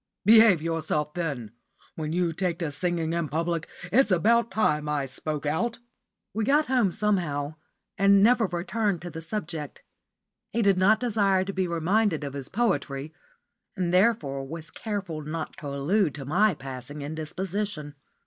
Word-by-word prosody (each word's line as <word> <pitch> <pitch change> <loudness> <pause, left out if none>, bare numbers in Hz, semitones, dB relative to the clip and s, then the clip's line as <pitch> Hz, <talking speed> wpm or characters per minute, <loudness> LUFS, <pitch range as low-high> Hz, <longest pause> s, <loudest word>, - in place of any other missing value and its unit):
"Behave 220 -6 +7
yourself, 155 -2 -1
then. 140 -11 -3 0.4
When 155 -1 -4
you 170 0 0
take 175 -1 -1
to 165 -4 -3
singing 165 +1 -1
in 170 -3 -1
public 165 +1 -1 0.2
it's 265 +2 +4
about 230 +6 +3
time 150 -8 +1
I 145 -2 0
spoke 150 +3 -5
out." 225 +11 0 0.6
We 220 - -1
got 290 +6 +3
home 250 -8 +2
somehow, 170 -9 0 0.5
and 200 0 +6
never 235 -1 +4
returned 185 +1 -1
to 175 - -6
the 160 - -7
subject. 160 -5 -5 0.7
He 230 +1 +1
did 195 -2 +3
not 215 +4 +5
desire 200 -6 +2
to 195 - -4
be 190 -1 0
reminded 170 +1 +1
of 140 -1 -5
his 140 -1 -6
poetry, 155 - -1 0.6
and 180 -2 -1
therefore 180 -9 +2
was 160 +1 -5
careful 195 -8 -4
not 155 +2 -5
to 155 -6 -7
allude 145 +5 +1
to 140 -2 -7
my 185 +6 +3
passing 135 +2 -7
indisposition. 160 +1 -4
170 Hz, 155 wpm, -26 LUFS, 150-205 Hz, 0.7 s, Behave